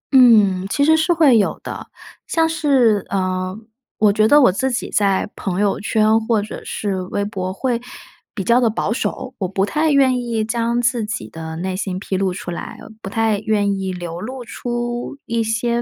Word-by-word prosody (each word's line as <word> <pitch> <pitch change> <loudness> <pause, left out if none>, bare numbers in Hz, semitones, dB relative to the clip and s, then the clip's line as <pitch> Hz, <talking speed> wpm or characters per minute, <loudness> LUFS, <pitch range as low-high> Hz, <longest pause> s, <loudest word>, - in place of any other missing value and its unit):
嗯， 205 -7 +5
其 285 +6 +2
实 320 +1 +5
是 320 +3 +1
会 295 -9 +5
有 - - 0
的， - - -7 0.4
像 325 -1 +2
是 270 - +2
呃， 185 0 -2 0.4
我 210 -1 +4
觉 215 +1 +3
得 295 +4 +6
我 250 - +6
自 260 +8 -1
己 235 - -3
在 195 -1 +1
朋 190 -1 -3
友 205 -1 +1
圈 215 +1 +2
或 225 -3 +3
者 210 +1 -6
是 195 -3 -3
微 195 +2 -3
博 185 -3 -4
会 240 +4 -2 0.5
比 195 - -3
较 240 +4 +3
的 235 - +3
保 220 0 -1
守， 260 +1 -4
我 190 - -1
不 195 +1 0
太 310 +9 0
愿 260 -3 +3
意 230 -3 -2
将 235 +1 0
自 235 -1 +1
己 210 +3 -4
的 160 0 -7
内 185 +2 -3
心 185 -1 -3
披 195 - -4
露 190 -1 0
出 185 -1 -6
来， 170 - -7 0.2
不 195 - -6
太 220 -1 +1
愿 205 -2 0
意 190 -1 -3
流 175 -1 -6
露 250 +2 -6
出 240 +3 -4
一 230 0 -1
些 235 +2 0
215 Hz, 210 characters per minute, -19 LUFS, 195-240 Hz, 0.5 s, 得